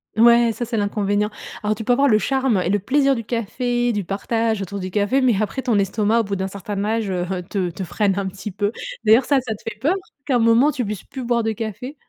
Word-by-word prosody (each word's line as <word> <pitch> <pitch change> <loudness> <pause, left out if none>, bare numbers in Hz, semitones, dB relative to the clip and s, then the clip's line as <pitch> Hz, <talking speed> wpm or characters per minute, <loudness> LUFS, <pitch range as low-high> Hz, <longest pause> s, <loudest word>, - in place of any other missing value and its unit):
Ouais 235 +1 +6
ça 240 +2 -4
c'est 230 -1 -3
l'inconvénient. 205 0 0 0.3
Alors 215 0 0
tu 220 - -6
peux 245 - +3
avoir 280 +3 +3
le 215 -4 +5
charme 265 -3 +1
et - - 0
le 205 +1 +2
plaisir 275 +6 +2
du 230 -3 -3
café, 240 +2 -1
du 205 -2 -1
partage 220 +3 -1
autour 200 +2 -6
du 185 0 -4
café, 210 +7 +1
mais 235 -6 +3
après 215 +5 -2
ton 235 -5 +1
estomac, 210 +3 +2
au - - -3
bout 200 -1 -3
d'un 190 0 -2
certain 200 +1 -5
âge, 220 -2 -1
heu, 180 -1 -1 0.2
te 185 -3 -1
te 185 +3 -6
freine 195 +3 0
un 200 - -1
petit 190 +2 -6
peu. 205 +2 -1 0.3
D'ailleurs, 225 +4 +6
ça 280 - +3
ça 230 -3 -4
te 215 - -12
fait 210 - -11
peur 305 +9 +2 0.3
qu'à 260 -4 +2
un - - +1
moment 230 +6 +4
tu 250 - -2
puisses 210 -1 -5
plus 265 -2 -7
boire 235 -1 +1
de 225 - 0
café? 225 +6 -5
220 Hz, 255 wpm, -21 LUFS, 200-240 Hz, 0.3 s, Ouais